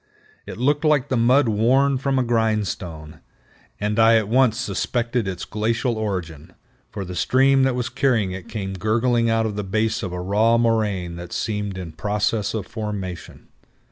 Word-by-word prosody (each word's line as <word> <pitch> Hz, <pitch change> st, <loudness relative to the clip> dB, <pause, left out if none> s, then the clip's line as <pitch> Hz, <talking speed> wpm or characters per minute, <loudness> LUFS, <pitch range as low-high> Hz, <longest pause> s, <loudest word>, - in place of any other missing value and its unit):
It -, -, -7 dB
looked 145 Hz, +5 st, +1 dB
like 150 Hz, -4 st, +2 dB
the 130 Hz, -, +1 dB
mud 125 Hz, +3 st, +4 dB
worn 130 Hz, +5 st, +2 dB
from 135 Hz, 0 st, 0 dB
a 130 Hz, -, +2 dB
grindstone, 100 Hz, -9 st, -2 dB, 0.6 s
and 105 Hz, +2 st, -1 dB
I 115 Hz, 0 st, +6 dB
at 110 Hz, -2 st, 0 dB
once 120 Hz, 0 st, +3 dB
suspected 120 Hz, -3 st, -1 dB
its 95 Hz, -2 st, -4 dB
glacial 115 Hz, +3 st, -1 dB
origin, 90 Hz, -6 st, -4 dB, 0.4 s
for 100 Hz, -, -6 dB
the 90 Hz, -, -7 dB
stream 135 Hz, +8 st, +3 dB
that 130 Hz, -2 st, +1 dB
was 125 Hz, -2 st, -2 dB
carrying 125 Hz, -7 st, +1 dB
it 95 Hz, -1 st, -8 dB
came 100 Hz, -3 st, -4 dB
gurgling 115 Hz, +4 st, +1 dB
out 115 Hz, 0 st, +2 dB
of 105 Hz, -2 st, -3 dB
the 105 Hz, -, -2 dB
base 110 Hz, +4 st, -1 dB
of 95 Hz, -5 st, -4 dB
a 90 Hz, -, -4 dB
raw 105 Hz, +5 st, +2 dB
moraine 105 Hz, -7 st, 0 dB
that 85 Hz, 0 st, -9 dB
seemed 105 Hz, -3 st, -3 dB
in 90 Hz, -3 st, -6 dB
process 105 Hz, +5 st, -1 dB
of 110 Hz, -, -3 dB
formation. 100 Hz, -6 st, -6 dB
110 Hz, 170 wpm, -22 LUFS, 95-120 Hz, 0.6 s, I